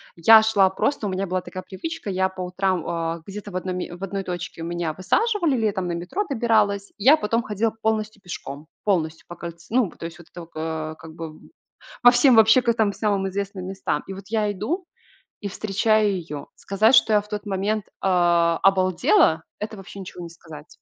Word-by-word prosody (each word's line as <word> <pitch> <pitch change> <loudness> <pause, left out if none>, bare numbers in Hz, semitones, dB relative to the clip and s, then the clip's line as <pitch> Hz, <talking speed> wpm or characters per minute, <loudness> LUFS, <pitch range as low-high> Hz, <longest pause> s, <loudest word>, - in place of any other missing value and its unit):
Я 220 +6 +8
шла 205 -3 +4
просто, 210 +3 -1
у - - -2
меня 190 +1 -2
была 185 +1 -1
такая 185 +1 -8
привычка, 270 - -6
я 190 0 +1
по 190 0 -8
утрам, 180 -3 -1
э, - - -20
где-то 205 +1 -8
в - - -10
одной 185 0 -3
ме 180 -1 -5
в 180 - -10
одной 195 0 -3
точке 175 -2 -6
меня 170 -1 -2
высаживали, 345 - +1
летом 205 -5 0
на - - -2
метро 180 - -3
добиралась, 215 -6 +1
я 265 +9 +6
потом 230 -3 0
ходила 215 +2 -1
полностью 215 -1 -1
пешком. 155 -5 -8 0.2
Полностью 160 -6 0
по 175 - -8
кольце 170 +3 -9
ну 250 -7 +3
то - - -9
есть, 170 +1 -8
вот 170 - -15
это 175 - -9
вот, 170 0 -13
э, 160 0 -4
как 160 0 -12
бы. 160 -2 -8 0.6
По 245 - +9
всем 245 +1 +5
вообще 220 +3 +6
к 235 -1 +2
там 220 -3 +1
самым 200 -2 0
известным 195 -1 -4
местам. 190 0 -2
И 195 - -5
вот 195 +1 -9
я 210 -1 0
иду 285 - -3 0.6
и 205 - -4
встречаю 210 +1 +1
ее. 155 -6 -6
Сказать, 215 +5 +2
что 220 - +6
я 210 - +5
в 205 - -14
тот 210 0 -5
момент, 205 +1 -1
э, - - -29 0.7
обалдела, 185 -3 +3 0.2
это 215 +1 -5
вообще 195 0 -10
ничего 180 -1 -8
не 170 - -8
сказать. 160 -3 -12
195 Hz, 200 wpm, -23 LUFS, 175-215 Hz, 0.7 s, По